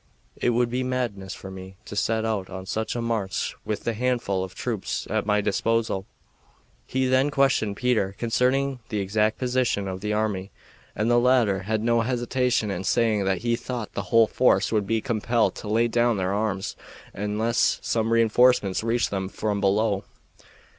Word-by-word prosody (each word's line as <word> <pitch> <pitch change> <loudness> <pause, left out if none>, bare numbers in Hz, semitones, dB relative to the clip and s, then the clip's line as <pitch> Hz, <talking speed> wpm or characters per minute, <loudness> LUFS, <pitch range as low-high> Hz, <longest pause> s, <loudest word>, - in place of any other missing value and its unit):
It - - 0
would 120 0 +1
be 125 +1 -1
madness 120 -7 -3
for 95 - -9
me 95 0 -9
to - - -8
set 110 +2 0
out 105 -4 -2
on 95 0 -7
such 110 +4 -2
a 120 - -2
march 110 -5 -2
with 105 - -3
the 115 - -1
handful 115 -5 0
of 95 0 -8
troops 110 -4 -3
at 110 0 0
my 105 0 +3
disposal." 105 -1 0 0.8
He 130 0 0
then 130 +2 +3
questioned 135 -8 +1
Peter 110 -6 +1
concerning 130 +3 +1
the 105 - -2
exact 105 +3 +1
position 125 -5 0
of 95 0 -5
the 105 +1 -2
army, 105 -3 -1 0.5
and 110 +3 +1
the 120 - +5
latter 120 -6 +3
had 110 -1 0
no 115 0 +3
hesitation 125 -1 0
in 95 -1 -3
saying 110 -1 +2
that 95 +2 0
he 120 0 +2
thought 120 -2 -5
the - - -2
whole 115 -1 +6
force 110 -4 +2
would 105 -3 0
be 115 +1 +1
compelled 115 0 +1
to - - -7
lay 115 +3 +2
down 120 -1 +2
their 95 0 -1
arms 100 -2 -2 0.4
unless 105 +4 +1
some 115 0 0
re 115 0 +5
enforcements 115 -3 +3
reached 115 +1 0
them 95 -1 -2
from 105 0 -2
below. 100 0 +1
110 Hz, 180 wpm, -25 LUFS, 100-120 Hz, 0.8 s, whole